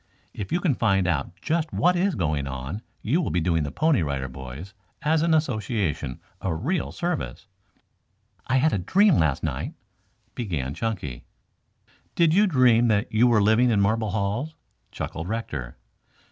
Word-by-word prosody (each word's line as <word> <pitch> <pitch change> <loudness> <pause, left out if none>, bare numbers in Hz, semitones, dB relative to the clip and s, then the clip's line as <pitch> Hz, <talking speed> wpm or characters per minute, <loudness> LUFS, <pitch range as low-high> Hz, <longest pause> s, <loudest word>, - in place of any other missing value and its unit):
"If 100 - -6
you 175 - +2
can 165 -6 +2
find 100 -6 +2
out 85 +2 -2
just 160 -1 0
what 180 +2 +3
is 185 +1 +1
going 80 -7 -1
on 65 +10 -5 0.2
you 150 +11 +2
will 160 - -2
be 90 - 0
doing 80 -1 +1
the 75 - -2
Pony 155 - +2
Rider 70 -3 -2
Boys, 65 +8 -9 0.3
as 155 +1 +2
an 165 0 +3
association, 110 - -1 0.2
a 90 -4 -1
real 160 - -1
service." 175 -1 -3 1.0
"I 130 - +2
had 155 +4 +3
a 100 - +1
dream 195 - +4
last 80 -4 +1
night," - - -3 0.6
began 80 - -3
Chunky. 90 - -4 0.9
"Did 165 -2 +4
you 205 +4 +5
dream 125 -7 +4
that 105 -1 +1
you 115 +3 +5
were 110 -4 +4
living 110 +4 +4
in 110 -3 +2
marble 110 +2 +1
halls?" 110 +10 -2 0.4
chuckled 85 +2 -5
Rector. 75 - -4
110 Hz, 160 wpm, -25 LUFS, -, 1.0 s, you